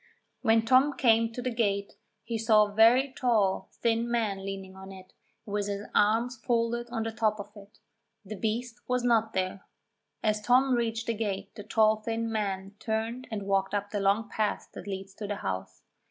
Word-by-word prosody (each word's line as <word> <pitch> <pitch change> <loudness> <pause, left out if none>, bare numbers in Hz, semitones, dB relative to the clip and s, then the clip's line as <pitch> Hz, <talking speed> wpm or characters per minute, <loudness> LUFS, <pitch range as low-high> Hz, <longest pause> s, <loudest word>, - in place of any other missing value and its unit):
When 225 -2 +3
Tom 260 +4 +4
came 230 -2 +4
to 245 +2 -6
the 250 -1 -2
gate 200 -3 0 0.3
he 230 0 -4
saw 215 -1 +5
a 205 - -9
very 245 +5 +5
tall, 215 -7 +1
thin 230 0 +1
man 215 -5 -1
leaning 195 -1 -6
on 190 0 -10
it, 185 -1 -13 0.3
with 205 -1 -2
his 200 0 -4
arms 230 +4 +2
folded 235 +1 -1
on 230 -2 -2
the 225 - -3
top 215 -1 0
of 205 +1 -8
it. 205 0 -15 0.5
The 205 - -6
beast 230 +3 -3
was 250 -1 0
not 225 -2 +2
there. 185 +1 -2 0.6
As 215 -1 +1
Tom 255 +4 +4
reached 230 -1 -1
the 230 - 0
gate 200 -3 -3
the 220 - -8
tall 215 0 +3
thin 225 +1 -3
man 195 -2 -2
turned 225 +3 -3
and 215 -3 -4
walked 195 0 0
up 205 0 -2
the 205 - -1
long 200 +3 +2
path 215 -2 -2
that 195 - -9
leads 195 0 -6
to 205 +1 -6
the 205 - -2
house. 95 -1 -4
220 Hz, 190 wpm, -28 LUFS, 200-230 Hz, 0.6 s, saw